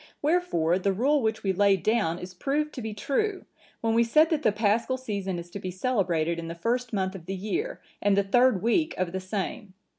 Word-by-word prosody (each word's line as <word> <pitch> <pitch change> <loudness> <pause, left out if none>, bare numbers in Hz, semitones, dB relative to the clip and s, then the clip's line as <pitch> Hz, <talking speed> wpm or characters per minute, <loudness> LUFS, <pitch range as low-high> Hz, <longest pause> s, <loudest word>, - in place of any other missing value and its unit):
Wherefore 285 - +2
the 195 +1 +1
rule 275 +8 +2
which 220 -1 -1
we 195 -1 +1
laid 195 -2 +3
down 175 -7 +1
is 180 +1 -8
proved 295 +9 -1
to 255 - -6
be 220 -1 -4
true, 370 - -1 0.4
when 225 -1 +1
we 230 +1 +4
said 305 +8 +4
that 310 -2 +1
the 220 - +3
Paschal 220 +5 +1
season 200 -7 -3
is 170 0 -8
to 200 - -6
be 185 - -5
celebrated 180 -6 0
in 165 - -6
the 165 - -5
first 240 +6 -1
month 190 -3 -1
of 180 -3 -10
the 195 - -3
year, 350 - -3 0.2
and 205 -1 +3
the 200 - +4
third 230 -1 +3
week 310 +8 +2
of 185 -2 -1
the 190 - -3
same. 190 0 -5
205 Hz, 220 wpm, -27 LUFS, 185-255 Hz, 0.4 s, we